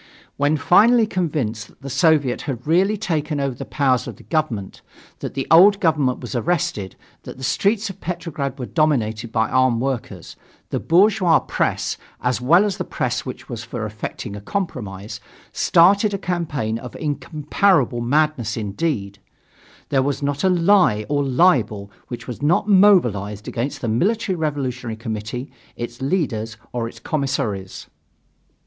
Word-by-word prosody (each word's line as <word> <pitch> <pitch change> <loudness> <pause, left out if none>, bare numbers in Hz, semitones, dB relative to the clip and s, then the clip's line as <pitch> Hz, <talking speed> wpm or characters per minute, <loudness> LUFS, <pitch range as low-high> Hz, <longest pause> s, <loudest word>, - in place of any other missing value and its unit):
When 145 +2 +1
finally 225 +8 +5
convinced 145 - -2
that - - -24
the - - -6
Soviet 145 -3 +2
had 125 -2 -4
really 190 +7 +2
taken 155 -7 -2
over 140 -1 -1
the 120 - -7
powers 130 -4 +1
of - - -6
the - - -16
government, 130 - -2 0.4
that - - -6
the 135 - -2
old 195 +5 +7
government 150 -8 +1
was 125 0 -6
arrested, 120 - -1 0.3
that - - -10
the 130 - -10
streets 205 - +1
of 195 - -17
Petrograd 160 -6 -4
were 125 - -4
dominated 120 -8 0
by 110 -1 +1
armed 130 -2 +2
workers, 130 -1 -4 0.4
the - - -1
bourgeois 185 -1 +4
press, - - -1 0.2
as 125 0 -1
well 170 +10 +5
as 200 -3 -2
the - - -2
press - - -3
which - - -7
was 115 -1 -6
for 115 -1 -5
effecting 105 0 -6
a 105 - -8
compromise, 105 - -5 0.3
started 200 +4 +4
a - - -1
campaign 150 - -2
of 125 +1 -9
incomparable 150 - 0
madness 130 -3 +1
indeed; 100 -2 -3 0.7
there 135 -2 +2
was 140 +1 -2
not 140 +2 -1
a 190 - +4
lie 170 - +3
or 145 -1 +1
libel 125 - +2 0.2
which 120 - -7
was 125 0 -7
not 165 +7 +2
mobilized 120 - +3
against 135 +4 -3
the 120 - -2
Military 190 - +1
Revolutionary 130 -7 -3
Committee, 110 +3 -5 0.2
its 120 +1 -7
leaders 120 - -1 0.2
or 120 -2 -2
its 115 -1 -11
commissaries. 130 -9 -3
140 Hz, 155 wpm, -21 LUFS, 115-170 Hz, 0.7 s, old